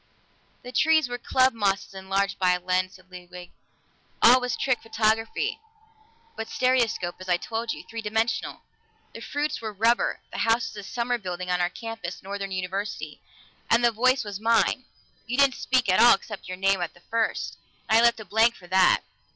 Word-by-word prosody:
"The 250 Hz, -, -8 dB
trees 315 Hz, +2 st, +3 dB
were 245 Hz, 0 st, -5 dB
club 260 Hz, +1 st, +2 dB
mosses 200 Hz, -2 st, -1 dB
enlarged 195 Hz, +1 st, -2 dB
by 180 Hz, -1 st, +3 dB
a 180 Hz, -, -1 dB
lens," 185 Hz, +1 st, -1 dB
said 185 Hz, 0 st, -20 dB
Ludwig. 180 Hz, 0 st, -11 dB, 0.7 s
"All 250 Hz, +2 st, +7 dB
was 250 Hz, -1 st, -2 dB
trick 260 Hz, -2 st, 0 dB
photography, 225 Hz, -, 0 dB, 0.8 s
but 225 Hz, -, -6 dB
stereoscopic, 235 Hz, -9 st, 0 dB
as 185 Hz, -, -8 dB
I 175 Hz, -, +3 dB
told 225 Hz, +4 st, -4 dB
you -, -, -7 dB
three 230 Hz, 0 st, -7 dB
dimensional. 220 Hz, +2 st, -2 dB, 0.5 s
The -, -, -9 dB
fruits 295 Hz, -1 st, -3 dB
were 220 Hz, -1 st, -4 dB
rubber; 225 Hz, +4 st, +1 dB
the -, -, -6 dB
house 230 Hz, +1 st, +1 dB
is -, -, -12 dB
a -, -, -5 dB
summer 240 Hz, +4 st, -2 dB
building 180 Hz, -2 st, -5 dB
on 180 Hz, 0 st, +1 dB
our 175 Hz, -, +1 dB
campus 225 Hz, -4 st, -7 dB
Northern 195 Hz, 0 st, -5 dB
University. 190 Hz, +2 st, -4 dB, 0.5 s
And 235 Hz, +1 st, +4 dB
the 235 Hz, -, +4 dB
voice 255 Hz, +4 st, +2 dB
was 205 Hz, -2 st, -6 dB
mine; 230 Hz, +3 st, +2 dB, 0.4 s
you 245 Hz, +2 st, -2 dB
didn't 280 Hz, -2 st, +5 dB
speak 255 Hz, -1 st, 0 dB
at 185 Hz, 0 st, +3 dB
all, 240 Hz, -, +8 dB
except 205 Hz, +1 st, -9 dB
your 185 Hz, 0 st, -6 dB
name 195 Hz, 0 st, +2 dB
at 175 Hz, -, -4 dB
the 175 Hz, -, -20 dB
first, 225 Hz, +4 st, -2 dB, 0.3 s
and 220 Hz, +1 st, +5 dB
I -, -, +5 dB
left 235 Hz, 0 st, +4 dB
a 220 Hz, -, -8 dB
blank 220 Hz, +5 st, +3 dB
for 180 Hz, -, -15 dB
that. 185 Hz, 0 st, +3 dB
220 Hz, 190 wpm, -25 LUFS, 185-235 Hz, 0.8 s, all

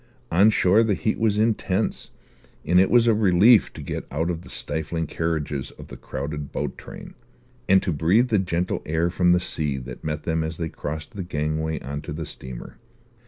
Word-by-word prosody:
On 100 Hz, +6 st, +6 dB
shore 100 Hz, 0 st, +4 dB
the 110 Hz, -3 st, +2 dB
heat 110 Hz, -, -1 dB
was 110 Hz, -2 st, +2 dB
intense, 110 Hz, -2 st, 0 dB, 0.6 s
and 90 Hz, +2 st, +4 dB
it 95 Hz, -, +4 dB
was 120 Hz, -1 st, +5 dB
a 115 Hz, -, +5 dB
relief 105 Hz, +2 st, +5 dB
to -, -, -8 dB
get -, -, -5 dB
out 80 Hz, +5 st, -1 dB
of 85 Hz, -1 st, -5 dB
the -, -, -14 dB
stifling 80 Hz, +1 st, -3 dB
carriages 75 Hz, -5 st, -2 dB
of -, -, -13 dB
the -, -, -8 dB
crowded 70 Hz, +1 st, -5 dB
boat -, -, -3 dB
train, -, -, -11 dB, 0.6 s
and 95 Hz, 0 st, +5 dB
to 90 Hz, -, -1 dB
breathe 95 Hz, -, +3 dB
the 105 Hz, -3 st, +3 dB
gentle 90 Hz, -1 st, -1 dB
air 80 Hz, +2 st, 0 dB
from 90 Hz, 0 st, +2 dB
the 90 Hz, 0 st, +5 dB
sea 75 Hz, -5 st, -1 dB
that 60 Hz, -1 st, -8 dB
met 75 Hz, -1 st, -3 dB
them 80 Hz, 0 st, 0 dB
as 80 Hz, 0 st, -4 dB
they 80 Hz, -1 st, -3 dB
crossed 75 Hz, +1 st, -6 dB
the 100 Hz, -, -6 dB
gangway 80 Hz, -1 st, -2 dB
on 70 Hz, +3 st, -5 dB
to -, -, -6 dB
the 80 Hz, +1 st, -5 dB
steamer. 65 Hz, -3 st, -9 dB
85 Hz, 200 wpm, -24 LUFS, 75-95 Hz, 0.6 s, On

